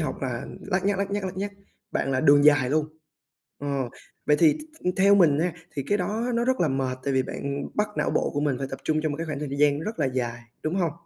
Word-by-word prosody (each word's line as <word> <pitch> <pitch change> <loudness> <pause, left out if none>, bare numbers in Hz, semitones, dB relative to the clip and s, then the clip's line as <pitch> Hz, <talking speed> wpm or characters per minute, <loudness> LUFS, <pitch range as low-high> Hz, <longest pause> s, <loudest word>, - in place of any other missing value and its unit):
học 150 -4 -2
là 125 0 -3
lắt 190 +1 -1
nhắt, 200 -1 +1
lắt 200 0 -1
nhắt, 205 -1 -2
lắt 185 0 -4
nhắt, 200 +1 -2 0.4
bạn 135 - -1
là 130 - +1
đường 145 -1 +6
dài 145 -4 +5
luôn. 155 0 +2 0.7
Ờ, 140 -3 -2 0.4
vậy 150 0 +5
thì 160 -3 +6
th 310 - -12
th - - +2
theo 200 +1 +6
mình 160 -7 +5
nha, 175 +1 +1 0.2
thì 140 - -1
cái 205 - +2
đó 215 +7 -1
nó 235 0 +1
rất 260 -3 +1
là 165 - +3
mệt, 130 -1 -1
tại 140 - 0
vì 130 - +3
bạn 140 +2 -4
bắt 210 0 +1
não - - +1
bộ - - +1
của 145 - 0
mình 145 -4 0
phải 135 - -3
tập 135 - -5
trung 155 0 +1
trong 155 -2 0
một - - -4
cái 165 0 -4
khoảng 150 -2 -3
thời 150 -1 -4
gian 145 0 +3
rất 215 +2 -5
là 145 - +2
dài, 120 -2 -2 0.2
đúng 155 +3 -1
hông? 170 -5 +1
150 Hz, 270 wpm, -26 LUFS, 140-190 Hz, 0.7 s, đường